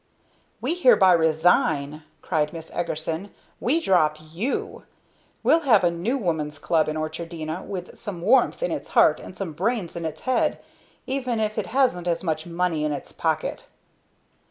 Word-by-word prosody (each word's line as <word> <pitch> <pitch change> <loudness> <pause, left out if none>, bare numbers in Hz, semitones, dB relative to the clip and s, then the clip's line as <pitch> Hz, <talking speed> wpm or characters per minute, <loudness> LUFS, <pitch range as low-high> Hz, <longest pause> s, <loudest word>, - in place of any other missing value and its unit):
"We - - +1
hereby 250 - +5
resign!" 160 -2 +2 0.2
cried 155 -3 0
Miss 165 -1 -8
Eagerson. 165 +2 -3 0.3
"We 285 +8 +2
drop 160 - +2
you! 165 - -4 0.6
We'll 330 - +5
have 240 - +4
a 175 - +4
New 190 +11 -1
Woman's 160 - -2
Club 155 -1 +1
in 155 - -3
Orchardina 160 +1 -4
with 180 -3 -7
some 195 -4 -6
warmth 260 - +3
in - - 0
its - - -4
heart - - +6
and - - -11
some 185 -5 -4
brains 195 +2 -2
in 170 - -4
its 155 -1 -5
head 255 -2 +1 0.5
even 255 -3 -1
if 215 0 -1
it - - -3
hasn't 235 -9 +1
as 170 +1 0
much 160 -1 -2
money 170 -2 -1
in 150 - 0
its 145 - -5
pocket!" - - -2
170 Hz, 160 wpm, -24 LUFS, 155-215 Hz, 0.6 s, heart